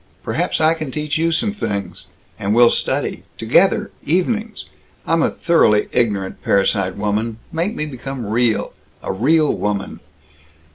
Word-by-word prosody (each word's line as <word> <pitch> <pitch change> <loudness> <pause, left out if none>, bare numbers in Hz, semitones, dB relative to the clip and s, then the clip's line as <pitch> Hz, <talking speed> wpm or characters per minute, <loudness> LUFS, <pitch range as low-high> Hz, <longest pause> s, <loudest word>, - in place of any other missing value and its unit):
Perhaps - - -1
I 160 +1 +4
can 155 -3 -5
teach 150 +2 -2
you 165 +1 +2
some 205 +6 0
things. 100 - -4 0.3
And 100 +2 0
we'll 120 0 +6
study - - -1 0.2
together - - +2
evenings! 215 - -1 0.4
I'm 165 0 +2
a - - +3
thoroughly 110 -11 +2
ignorant 100 -6 -1
parasite 95 -1 +1
woman. 105 +2 -1
Make 175 +7 -1
me 155 - -2
become 135 -3 -6
real! 115 +1 0 0.3
A - - -2
real 150 +9 +3
woman!" 100 -1 -3
125 Hz, 140 wpm, -19 LUFS, 105-160 Hz, 0.4 s, we'll